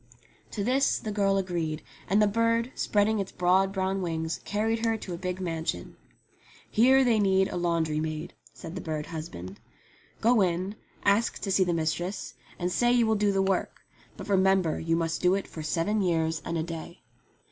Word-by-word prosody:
To 205 - -3
this 260 +5 +2
the 215 - -5
girl 200 -1 +2
agreed, 170 -5 -2 0.3
and 200 +3 +4
the 210 - +5
bird, 230 +3 +1
spreading 210 +1 +1
its 195 - -3
broad 185 +2 +2
brown 190 0 -1
wings, 160 -2 -2
carried 225 +2 -1
her 225 -1 +1
to 190 -4 -7
a - - -4
big 180 0 -3
mansion. 165 -2 -3 0.8
"Here 260 +4 +5
they 235 -4 +3
need 190 -1 +3
a - - -5
laundry 165 -3 0
maid," 155 0 -4 0.2
said 165 - -9
the 185 - -5
bird 155 -2 -3
husband. 155 - -7 0.6
"Go 230 -1 +4
in, 185 +2 0 0.3
ask 205 +3 +3
to 195 - -1
see 190 0 +4
the 180 - 0
mistress, 170 +4 -2 0.2
and 180 0 -2
say 240 +5 +2
you 245 -1 +4
will 220 - +2
do 205 -1 +2
the 195 0 +1
work; 190 -1 -1 0.3
but - - -8
remember 190 -4 +2
you 165 0 0
must 165 -1 -1
do 180 +1 +4
it 195 - -2
for 160 - -8
seven 175 +7 0
years 165 -3 0
and 170 - -3
a 160 - 0
day." 165 +1 -8
190 Hz, 190 wpm, -28 LUFS, 165-205 Hz, 0.8 s, the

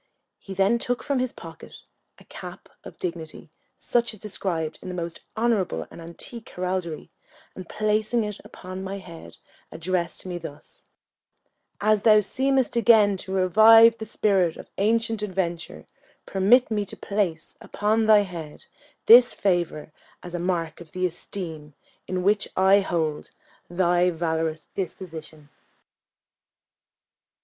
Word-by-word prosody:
He 195 - -9
then 195 +5 +2
took 245 +1 -2
from 280 -2 0
his 255 -1 -1
pocket - - -12 0.4
a - - -17
cap - - -11
of - - -11
dignity, 165 -2 -6 0.3
such 235 -2 0
as - - -17
described 175 -6 -3
in 185 - -7
the 180 - -5
most 170 -1 -5 0.2
honourable 220 -5 0
and - - -11
antique 195 +8 -10
heraldry, 180 -3 -4 0.4
and 185 -2 -10
placing 215 +2 0
it 210 -1 -5
upon 185 +1 -9
my 195 +1 -5
head, 165 - -12 0.3
addressed 170 +1 -3
me 180 -1 -4
thus: 150 -3 -12 0.9
"As 215 0 +2
thou 215 -1 +6
seemest 265 +4 0
again 220 -4 +5
to 190 - -7
revive 220 +5 +6
the 220 - -6
spirit 195 -6 +1
of - - -12
ancient 225 +1 +1
adventure, 180 -4 -4 0.4
permit 220 +6 +3
me 210 -1 0
to 195 - -11
place 190 -6 -2
upon 220 +2 0
thy 215 -1 +6
head 170 -6 -8 0.4
this 240 +2 +8
favour, 175 -5 -1 0.3
as 175 - -9
a 175 - -2
mark 175 -2 -2
of 165 - -14
the 185 0 -1
esteem 160 -4 -6 0.3
in 185 -1 -2
which 205 +2 +2
I 190 +1 +6
hold 165 -6 -2 0.4
thy 175 0 +2
valorous 160 -2 -2
disposition." 160 -5 -7
190 Hz, 135 wpm, -25 LUFS, 170-215 Hz, 0.9 s, this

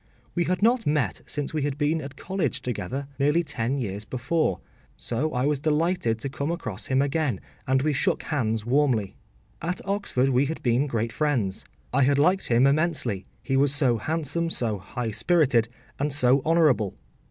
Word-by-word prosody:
We 175 -1 +1
had 185 +2 -1
not 235 -2 +3
met 145 -3 0
since 145 0 -4
we 155 - 0
had 140 0 -1
been 155 +2 +1
at 140 0 -8
college 185 -8 -2
together, 125 +3 -3
nearly 150 +5 +3
ten 125 -3 -2
years 105 -5 -3
before, 125 - -1 0.4
so 135 +7 -2
I 125 -1 0
was 145 -1 +1
delighted 155 -4 +1
to 115 - -4
come 140 +2 -3
across 130 - -4
him 130 +1 +3
again, 140 - 0 0.3
and 130 +1 +2
we 155 0 +2
shook 140 - 0
hands 115 -7 -1
warmly. 125 -6 +1 0.5
At 175 +2 -2
Oxford 195 -10 0
we 135 +2 +3
had 160 - -5
been 125 +4 +2
great 115 -3 -2
friends. 125 -11 -1 0.3
I 140 - +3
had 140 +1 +4
liked 180 +7 +3
him 120 +2 +4
immensely, 140 - +1 0.2
he 135 - -1
was 140 +1 +3
so 130 -5 +2
handsome, 165 +4 -2
so 110 -9 -2
high 115 +4 -4
spirited, 130 - +2 0.3
and 145 +2 0
so 130 -1 +3
honourable. 150 - +3
140 Hz, 175 wpm, -26 LUFS, 120-155 Hz, 0.5 s, had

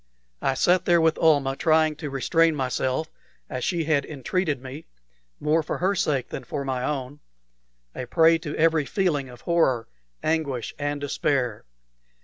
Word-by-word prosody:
I 135 - +1
sat 180 +5 +3
there 175 -1 +4
with 160 -1 +2
Almah, 145 -4 +3
trying 155 0 +3
to 150 -2 -5
restrain 160 +4 +2
myself 130 +2 -1 0.4
as 130 -1 -3
she 170 -3 0
had 150 -2 +2
entreated 150 +2 -2
me, 135 +4 -9 0.5
more 155 +2 +2
for 150 - -4
her 190 +3 +1
sake 150 -8 0
than - - -6
for 140 -1 -4
my 130 -2 -2
own, 140 0 -3 0.7
a 125 - -6
prey 165 +4 +4
to 150 -2 -5
every 160 -2 +3
feeling 150 -9 0
of 125 -1 -13
horror, 150 -9 +1 0.4
anguish, 155 -6 -1
and 145 0 -2
despair. 140 -5 -1
150 Hz, 155 wpm, -25 LUFS, 135-165 Hz, 0.7 s, there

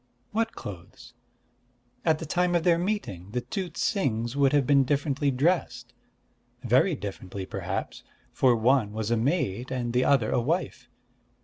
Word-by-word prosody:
"What 225 +1 0
clothes?" 105 +7 -10 0.9
"At 160 -2 +3
the 160 - -6
time 175 +3 +1
of 170 - +2
their 170 -1 +3
meeting, 170 - -3
the 125 - 0
two 195 - -4
Ts'ings 135 - -1
would 140 -1 +3
have 145 -2 +3
been 140 0 +5
differently 140 +1 0
dressed, 155 +7 0 0.7
very 130 - +3
differently, 95 -3 -6
perhaps; - - -4 0.3
for 125 -2 +4
one 115 -2 +2
was 110 +1 -3
a - - +4
maid, 125 - -1
and 120 -2 -3
the 125 +1 +3
other 135 -6 +3
a - - +2
wife. 130 -3 -2
130 Hz, 150 wpm, -27 LUFS, 115-165 Hz, 0.9 s, been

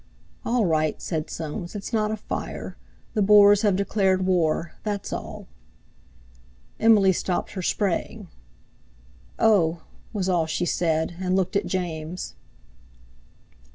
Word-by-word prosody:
"All 235 -2 +1
right!" 155 -3 +1
said 155 -3 -3
Soames, 165 +4 -6
"it's 205 +3 -6
not 215 -1 +1
a 220 - -2
fire. - - -6 0.4
The 215 - +1
Boers 205 0 +7
have 205 -4 +3
declared 190 -1 +1
war—that's 180 +3 -1
all." - - -6 1.3
Emily 210 -4 +5
stopped 180 0 -2
her 190 - -5
spraying. 190 0 -1 1.1
"Oh!" 175 -7 +3 0.3
was 195 -4 -2
all 175 -4 +1
she 165 +2 -1
said, 165 -1 0
and 185 0 0
looked 190 +1 0
at 200 - +1
James. 175 -2 -4
185 Hz, 120 wpm, -24 LUFS, 170-205 Hz, 1.3 s, Boers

